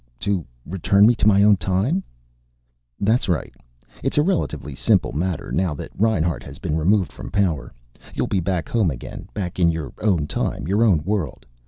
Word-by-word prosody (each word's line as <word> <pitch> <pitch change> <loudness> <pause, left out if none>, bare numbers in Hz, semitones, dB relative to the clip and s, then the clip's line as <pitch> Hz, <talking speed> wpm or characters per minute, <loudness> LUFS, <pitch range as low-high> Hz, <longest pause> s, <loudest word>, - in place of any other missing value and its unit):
"To 100 -4 0 0.2
return 95 +4 +3
me 120 - +6
to 115 - +1
my 100 -1 +5
own 105 -1 +6
time?" 95 - 0 1.0
"That's 110 +1 +2
right. 85 -4 -1 0.5
It's - - -1
a 150 - +5
relatively 160 - -1
simple 65 - +2
matter, 85 +1 -2
now 90 -4 0
that - - -8
Reinhart 90 -7 +1
has - - -10
been 75 - -2
removed 90 +4 +2
from - - -9
power. 90 -8 0 0.4
You'll - - 0
be 100 - 0
back 90 -1 -1
home 110 -7 +2
again, 65 -5 -7
back 95 -3 -4
in 85 -2 +5
your 80 -6 -3
own 95 -8 +2
time, 75 - -2
your 100 +5 +2
own 90 -10 +3
world. 95 -8 -2
95 Hz, 180 wpm, -22 LUFS, 80-105 Hz, 1.0 s, me